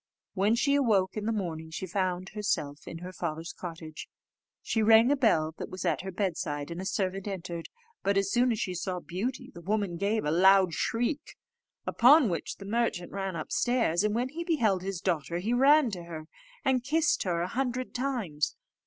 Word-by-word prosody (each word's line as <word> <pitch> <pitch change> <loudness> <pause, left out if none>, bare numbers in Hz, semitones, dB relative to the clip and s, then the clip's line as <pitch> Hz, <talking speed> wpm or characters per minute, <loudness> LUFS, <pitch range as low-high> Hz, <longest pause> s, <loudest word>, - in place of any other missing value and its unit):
When 210 +3 +2
she 280 +4 +2
awoke 215 -9 +2
in 215 0 -3
the - - +2
morning, 165 -7 -3
she 160 +4 -5
found 185 0 -2
herself 150 -8 -2
in 165 - -6
her 185 - -7
father's 165 -1 -4
cottage. 165 -3 -8 0.6
She 225 - 0
rang 225 +3 +6
a - - +4
bell 160 - +2
that - - -5
was 185 0 -6
at 165 -5 +1
her 190 +1 -5
bedside, 170 -6 -2
and 170 +2 -5
a - - -5
servant 195 0 -2
entered; 175 -4 -5 0.3
but 200 0 +1
as 195 0 +1
soon 245 +1 +3
as 220 - -1
she 185 -5 -2
saw 180 +1 -3
Beauty, 195 +9 -4
the 170 - -10
woman 200 -1 -1
gave 205 +2 0
a 150 - +1
loud 190 +1 +5
shriek; 245 - -1 0.5
upon 265 0 +6
which 170 - -3
the 195 - -11
merchant 215 -5 -1
ran 195 -2 -3
upstairs, 190 +2 +1
and 210 0 +1
when 245 +2 0
he 335 +5 -5
beheld 225 - +1
his 190 -2 -4
daughter 170 -2 -1
he 210 +7 -1
ran 275 0 +5
to 175 -3 -6
her, 160 -2 -7 0.4
and 255 -2 +2
kissed 315 +5 +2
her 170 -3 0
a - - -2
hundred 255 +2 -2
times. 235 - -1
195 Hz, 195 wpm, -29 LUFS, 170-235 Hz, 0.6 s, rang